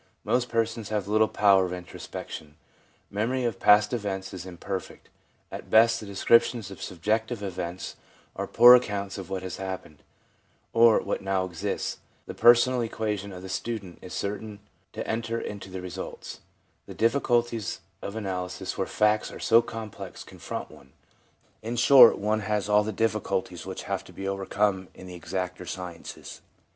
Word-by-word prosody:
Most 125 -1 +1
persons 115 -1 -1
have 105 -3 -2
little 110 +1 +3
power 100 -3 +4
of 90 - -5
introspection; 85 -4 -8 0.6
memory 120 +6 -1
of 115 -5 -2
past 105 +1 +5
events 95 -4 -3
is 95 0 -7
imperfect; 95 +1 -6 0.4
at - - -8
best, 115 +1 +5
the 105 - -9
descriptions 115 +1 +3
of 95 - -10
sub 85 -3 -8
jective 110 +1 0
events 90 -2 -5 0.4
are - - -3
poor 120 +1 +9
accounts 100 -5 +1
of 95 - -8
what 95 -1 -3
has 95 -2 -5
happened, 95 -5 -6 0.7
or 115 -1 +6
what - - -3
now 95 -1 0
exists; 85 -3 -3 0.3
the - - -7
personal 120 +1 +5
equation 105 -3 -3
of 90 -1 -9
the - - -7
student 95 -1 -5
is 90 - -10
certain 105 +1 -4 0.3
to - - -6
enter 115 +1 -2
into 100 -3 -7
the 95 0 -6
results; 90 +1 -7 0.5
the - - -9
difficulties 120 -2 +1 0.2
of 100 - -6
analysis 90 -4 -4
where - - 0
facts 105 0 +1
are - - -9
so 115 +1 +5
complex 110 -3 -8
confront - - -7
one 65 0 -17 0.4
— - - -38
in 115 +2 -4
short, 130 +3 +8
one 105 +2 0
has 105 -1 -1
all 105 0 +4
the 110 - -3
difficulties 100 -5 -2
which - - -6
have - - -3
to - - -14
be 95 - -6
over 95 0 -3
come 95 -2 +1
in 95 - -11
the 90 - -9
exacter 90 +1 -4
sciences. 90 -1 -8
105 Hz, 165 wpm, -27 LUFS, 95-115 Hz, 0.7 s, poor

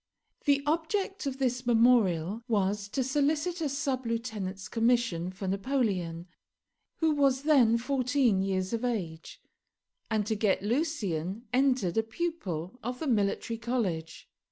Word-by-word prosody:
The 280 -1 +3
object 335 +3 -1
of 270 -1 -3
this 250 -2 -1
memorial 225 -5 +3
was 205 -2 0
to 260 +6 -1
solicit 295 +6 0
a 305 - 0
sub 270 -3 -2
lieutenant's 215 -5 -3
commission 230 -7 +1
for 190 +1 -6
Napoleon, 195 -6 -1 0.8
who 320 -1 +4
was 275 -2 +2
then 255 -7 +5
fourteen 255 -4 +1
years 190 +1 -1
of 230 +1 -2
age, 180 -10 -3 0.7
and 215 -2 +1
to 220 - 0
get 205 -3 +1
Lucien 210 - -1
entered 250 -7 +2
a - - +4
pupil 220 - -4
of 245 +2 -4
the - - -3
Military 225 -1 0
College. 205 -10 -2
230 Hz, 130 wpm, -29 LUFS, 195-270 Hz, 0.8 s, then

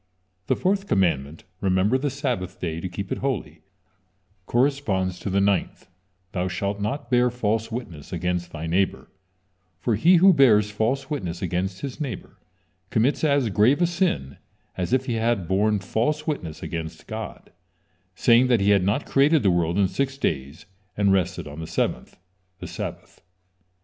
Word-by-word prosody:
The - - +2
fourth 195 +1 0
commandment: 80 - 0 0.2
"Remember 95 +4 +2
the 140 +2 0
Sabbath 125 - -3
day, 80 -2 -3
to 95 - -4
keep 95 +2 -6
it - - -2
holy," 100 - -3 0.9
corresponds 120 -9 0
to - - -4
the 95 +1 +1
ninth: 100 -2 0 0.4
"Thou 90 -2 -1
shalt 100 +3 -3
not 115 +7 -3
bear 125 0 +4
false 115 -1 -1
witness 90 - -7
against 90 0 -2
thy 80 0 -6
neighbor," 95 +4 -1 0.7
for 120 - 0
he 165 - +5
who 185 +2 +7
bears 105 -8 +5
false 130 +7 -1
witness 90 - -3
against 95 +1 -2
his 140 +2 -6
neighbor 125 -10 -6 0.5
commits 130 +7 +1
as 140 -6 +3
grave 110 - +3
a 175 - +4
sin 170 - -1 0.4
as 90 +3 -3
if 130 0 +2
he 125 - -2
had 115 -5 0
borne 105 +3 +2
false 120 +10 -1
witness 90 - -4
against 80 -1 -6
God, 110 0 -7 0.6
saying 120 +5 +5
that 120 -3 +3
He 100 +1 +4
had 100 -2 +4
not 100 +9 0
created 145 +1 +3
the 95 - +4
world 85 0 +1
in 100 -1 +4
six 135 +6 -2
days 70 - -3 0.3
and 100 -1 +3
rested 90 -4 0
on 75 +2 -9
the 80 - -6
seventh, - - -2 0.4
the - - -8
Sabbath. - - -7
105 Hz, 165 wpm, -24 LUFS, 90-130 Hz, 0.9 s, who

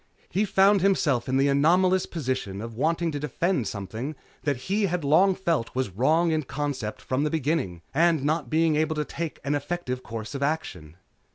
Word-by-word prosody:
He 205 +3 +1
found 195 0 +4
himself 150 -10 +2
in 130 - +2
the 135 +1 +3
anomalous 180 +7 +3
position 130 - -3
of 115 +2 -6
wanting 165 +7 0
to 145 - -3
defend 150 - -1
something 110 - -5 0.3
that 140 0 0
he 200 +2 +1
had 180 -2 -2
long 180 +7 +4
felt 165 -13 -1
was 130 -6 -1
wrong 155 - +2
in 155 -1 +1
concept 135 -6 -4
from 130 +2 0
the 150 - +1
beginning 140 - -1
and 160 -1 +3
not 150 -3 0
being 160 +1 +2
able 155 +1 +1
to 150 0 -1
take 165 0 -5
an 140 +3 0
effective 145 -3 -3
course 110 0 -7
of 140 - -5
action. 140 - -3
150 Hz, 185 wpm, -26 LUFS, 130-170 Hz, 0.3 s, found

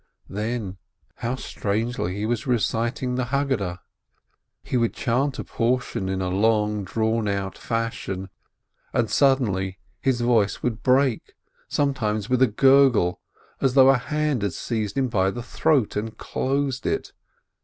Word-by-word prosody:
Then, 105 -2 -3 0.4
how 120 +2 -2
strangely 110 -5 -2
he 105 +1 -2
was 120 +5 -2
reciting 120 +1 0
the 125 0 0
Haggadah! 125 -10 -1 0.8
He - - -4
would 115 -2 +1
chant 135 +3 0
a - - -3
portion 120 -5 -1
in 95 0 -1
long 105 +2 +1
drawn 110 +2 0
out 100 -1 -2
fashion, 105 -5 -3 0.6
and - - +1
suddenly 100 -9 +2 0.2
his 130 -3 +1
voice 115 -4 +2
would 115 -3 -1
break, 130 -1 +2 0.3
sometimes 115 -6 -1
with 125 0 +2
a 130 - +7
gur 135 +5 +6
gle, 90 -7 0 0.4
as 135 -1 +2
though 135 -1 +8
a 135 - +3
hand 150 -2 -1
had 100 -4 -1
seized 110 +3 -3
him 135 -1 +2
by 95 -5 +1
the 120 +4 -5
throat 140 -2 +1
and 110 +1 -3
closed 135 -1 -1
it. - - -2
115 Hz, 145 wpm, -24 LUFS, 105-130 Hz, 0.8 s, though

